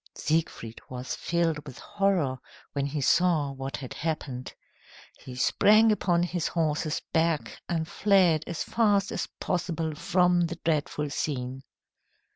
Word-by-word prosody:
Siegfried 155 -8 -2
was 125 0 -5
filled 165 -3 0
with 130 - -9
horror 180 -10 0 0.3
when 140 -1 -1
he 145 +1 -3
saw 160 -1 +3
what 135 0 -5
had 130 -3 -7
happened. 150 -5 -4 0.7
He 125 - -10
sprang 215 - +5
upon 175 -4 +2
his 175 -2 -1
horse's 155 -2 -1
back 165 -2 0
and 160 -2 -1
fled 180 -5 +3
as 170 - -3
fast 205 -4 +2
as - - -2
possible 165 -3 -2
from 175 +2 +2
the 170 - -5
dreadful 150 -2 0
scene. 130 -3 -3
160 Hz, 130 wpm, -27 LUFS, 140-175 Hz, 0.7 s, sprang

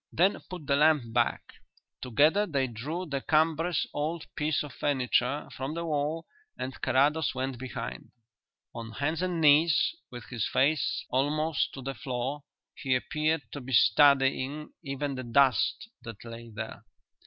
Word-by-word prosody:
"Then 185 +4 +2
put 180 -5 -7
the 140 - +2
lamp 145 -6 +3
back." - - +1 0.6
Together 155 - +3
they 140 -5 0
drew 140 +10 -5
the 140 -4 -3
cumbrous 160 +2 +2
old 155 +2 -2
piece 150 0 0
of 145 -3 -9
furniture 135 0 0
from 135 +4 -4
the 170 0 -3
wall 155 +1 -1 0.3
and 130 +1 -4
Carrados 145 +3 +2
went 130 -1 -3
behind. 130 0 -6 0.6
On 115 -1 -7
hands 155 +6 -1
and 180 -2 -1
knees, 160 - +5 0.2
with 120 -2 -9
his 120 -3 -2
face 145 +2 +1
almost 150 +4 +1
to 135 - -8
the 135 +1 -3
floor, 130 +4 -4 0.3
he 130 -2 0
appeared 155 +4 0
to 145 - -6
be 130 +1 -6
studying 140 +4 +4
even 140 -1 -3
the 130 -1 -5
dust 130 - +2
that 115 -3 -10
lay 115 0 -9
there. 110 0 -7
140 Hz, 150 wpm, -29 LUFS, 130-155 Hz, 0.6 s, knees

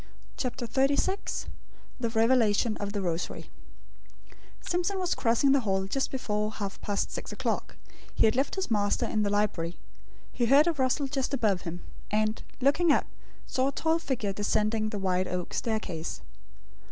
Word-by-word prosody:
CHAPTER 250 -1 -3
XXXVI 280 - +1 0.5
THE 235 -2 0
REVELATION 225 -1 +3
OF 205 -1 -3
THE 200 -2 -2
ROSARY 170 -1 -3 1.1
Simpson 360 +3 -1
was 365 -2 0
crossing 235 +3 +3
the 280 - +5
hall 195 -5 0
just 265 +8 -1
before 210 -4 -2
half 200 -2 -5
past 205 -1 -1
six - - -5
o'clock. - - -2 0.4
He - - +4
had 220 - +3
left 270 +2 +1
his 385 -9 -3
master 205 -2 +2
in 215 - 0
the 205 - +1
library. 195 -5 0 0.5
He 240 - 0
heard 280 +5 +7
a 340 - +2
rustle 270 0 +1
just 270 0 -1
above 210 -8 +1
him; 175 +2 -7 0.3
and, 215 +1 +1 0.2
looking 290 +6 +4
up, - - +3 0.4
saw 260 +1 0
a - - +1
tall 320 +4 +1
figure 235 -10 -2
descending 215 +2 +1
the 210 - -4
wide 185 -1 0
oak 180 -1 -3
staircase. 205 -8 -3
225 Hz, 160 wpm, -29 LUFS, 205-270 Hz, 1.1 s, heard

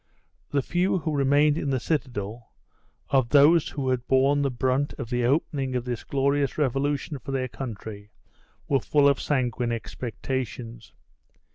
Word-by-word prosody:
The 140 -2 0
few 180 +5 +1
who 160 -3 -2
remained 145 +2 +3
in 140 - -2
the 130 -1 +1
citadel, 120 -7 -3 0.6
of 130 -4 +3
those 150 +4 +5
who 135 -3 -3
had 125 -1 -1
borne 135 +2 +3
the 140 - +1
brunt 130 +3 0
of 115 - -7
the 120 0 0
opening 135 -1 0
of 125 -1 -2
this 120 -2 -4
glorious 140 0 0
revolution 145 +1 -1
for 130 - -7
their 130 -1 -1
country, 110 -5 -7 0.6
were 135 - +2
full 145 +3 +3
of 140 -2 +2
sanguine 125 -4 0
expectations. 115 -1 -5
135 Hz, 150 wpm, -26 LUFS, 120-145 Hz, 0.6 s, those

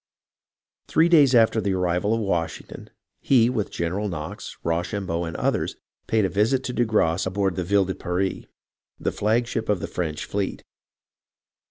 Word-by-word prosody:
Three 165 +2 +3
days 145 -6 +6
after 110 -1 +4
the 95 -1 0
arrival 90 +4 +1
of 115 - -2
Washington, 85 -5 -3 0.3
he, 125 -3 +4
with 110 -5 -2
General 95 +5 -2
Knox, 85 +4 -6
Rochambeau, 85 +1 -2
and 80 - -5
others, - - -1 0.3
paid 110 -2 +2
a - - +3
visit 115 +7 +1
to 125 - -4
de 120 - +2
Grasse 95 -6 +1
on 95 - -4
board 95 -2 0
the 90 - -2
Ville 100 +2 +2
de 95 - -2
Paris, 95 +2 -2 0.5
the - - -1
flagship 115 +1 0
of 105 -3 +2
the - - -4
French 80 -4 -3
fleet. 100 -1 -3
100 Hz, 165 wpm, -24 LUFS, 90-110 Hz, 0.5 s, days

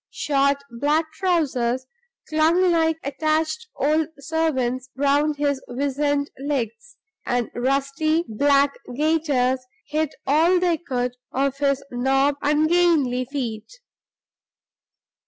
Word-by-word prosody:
Short 280 -1 +1
black 300 +6 0
trousers 265 -9 0 0.4
clung 330 +4 +3
like 320 -1 +2
attached 310 +7 -1
old 305 +2 +1
servants 270 -4 -1
round 285 +2 +2
his 285 -2 0
wizen 285 +2 0
legs; 285 - -4 0.3
and 245 -1 -1
rusty 275 +6 0
black 280 +5 +3 0.2
gaiters 285 -5 +1 0.2
hid 310 0 -1
all 325 +6 +4
they 350 -2 +2
could 250 -6 -3
of 275 +1 -1
his 275 -1 +1
knobbed, 270 +3 +1
ungainly 300 -4 +2
feet. 240 -5 -5
285 Hz, 100 wpm, -23 LUFS, 265-315 Hz, 0.4 s, all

